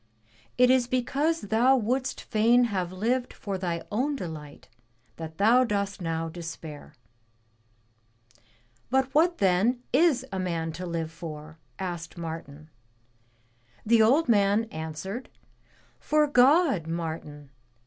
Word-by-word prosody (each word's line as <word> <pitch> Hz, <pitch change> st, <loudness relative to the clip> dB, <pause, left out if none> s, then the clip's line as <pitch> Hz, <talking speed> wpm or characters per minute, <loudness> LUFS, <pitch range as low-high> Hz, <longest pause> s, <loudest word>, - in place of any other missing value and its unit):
It 250 Hz, 0 st, +6 dB
is 255 Hz, -2 st, +3 dB
because 275 Hz, +6 st, 0 dB
thou 230 Hz, +6 st, +3 dB
wouldst 255 Hz, +2 st, -1 dB
fain 230 Hz, +3 st, +3 dB
have 180 Hz, -2 st, -2 dB
lived 240 Hz, +7 st, -1 dB
for 195 Hz, -2 st, -5 dB
thy 170 Hz, -2 st, -3 dB
own 265 Hz, +7 st, 0 dB
delight 155 Hz, -, -8 dB, 0.5 s
that 160 Hz, -1 st, -8 dB
thou 230 Hz, +6 st, +5 dB
dost 200 Hz, -4 st, -2 dB
now 165 Hz, -1 st, -2 dB
despair.'* 165 Hz, -3 st, -9 dB, 1.9 s
But 265 Hz, +1 st, +1 dB
what 340 Hz, +3 st, +3 dB
then 200 Hz, +6 st, +2 dB
is 290 Hz, -2 st, +3 dB
a 190 Hz, -, -3 dB
man 165 Hz, -3 st, -2 dB
to 180 Hz, +3 st, -6 dB
live 165 Hz, -2 st, -3 dB
for?" 155 Hz, -1 st, -9 dB, 0.2 s
asked 175 Hz, -3 st, -5 dB
Martin. 160 Hz, -2 st, -8 dB, 1.1 s
The 230 Hz, +1 st, +5 dB
old 270 Hz, +9 st, +4 dB
man 205 Hz, -1 st, +3 dB
answered, 160 Hz, +9 st, -6 dB, 0.8 s
*Tor 300 Hz, 0 st, +4 dB
God, 275 Hz, -, +4 dB
Martin! 160 Hz, -4 st, -5 dB
200 Hz, 120 wpm, -27 LUFS, 165-250 Hz, 1.9 s, It